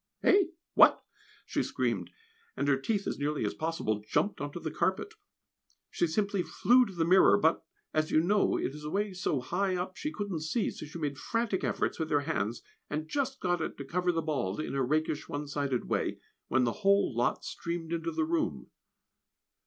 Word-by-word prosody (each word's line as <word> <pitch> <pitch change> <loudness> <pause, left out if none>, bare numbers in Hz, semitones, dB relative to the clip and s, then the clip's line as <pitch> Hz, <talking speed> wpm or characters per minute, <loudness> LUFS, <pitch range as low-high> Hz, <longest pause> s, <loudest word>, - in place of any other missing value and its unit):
"Eh! 390 -1 +6 0.3
what?" - - +6 0.4
she - - -1
screamed, - - -1 0.5
and 140 - 0
her 140 - +5
teeth 200 +9 -1
as - - -3
nearly 145 +1 -1
as - - -1
possible 155 -10 -2
jumped 205 - +1
on 145 0 -3
to 175 - -6
the 155 - -4
carpet. 190 - -1 0.8
She 175 - +1
simply 200 +3 0
flew 245 +7 +4
to 195 - -9
the 165 -1 +1
mirror, 185 +4 +6
but, 165 -5 +2 0.3
as 155 0 +1
you - - +4
know, 200 +5 +2
it 135 - -2
is 150 0 -9
away 200 +6 -1
so 185 -7 -1
high 185 +8 0
up 180 +1 -3
she 305 - -3
couldn't 205 - -3
see, 160 +9 -1
so - - -8
she 155 - -8
made 145 -4 -3
frantic 215 - -1
efforts - - -1
with 160 -1 -2
her 145 - +3
hands, 115 -4 -2 0.3
and 155 +1 -3
just 275 - -1
got 175 -2 +1
it - - -4
to 140 - -6
cover 180 +4 +1
the 165 -1 -1
bald, 135 -11 -1
in 155 - -3
a 135 - 0
rakish, 155 +3 0
one 145 0 -4
sided 140 -3 -1
way, - - -1 0.3
when 130 0 +2
the 120 - +2
whole 200 - +3
lot 120 +1 0
streamed 170 -1 -4
into 165 - -1
the 325 0 0
room. 325 -1 -1
165 Hz, 200 wpm, -30 LUFS, 145-200 Hz, 0.8 s, Eh